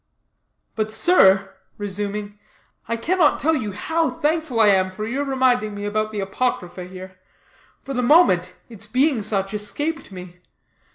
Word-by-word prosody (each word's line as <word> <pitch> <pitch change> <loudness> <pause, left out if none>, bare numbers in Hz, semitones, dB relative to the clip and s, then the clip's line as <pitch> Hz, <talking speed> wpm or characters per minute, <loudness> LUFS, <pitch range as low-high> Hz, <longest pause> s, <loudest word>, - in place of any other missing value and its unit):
"But, 215 -1 -2
sir," 195 - +4 0.2
resuming, 205 0 -5 0.5
"I 230 +1 -2
cannot 330 +5 +2
tell 320 +2 +1
you 215 -8 -3
how 320 - -1
thankful 295 -1 -1
I 215 -2 +6
am 190 -1 +3
for 210 +3 -6
your 260 +6 -2
reminding 255 -6 +1
me 205 0 -5
about 215 +1 -1
the 210 -2 -3
apocrypha 195 -3 -3
here. 185 0 -11 0.6
For 275 - -6
the 250 - 0
moment, 185 - +4
its 220 -3 -8
being 255 +2 +2
such 195 -1 -1
escaped 285 +8 -3
me. 180 -1 -10
215 Hz, 150 wpm, -22 LUFS, 195-265 Hz, 0.6 s, I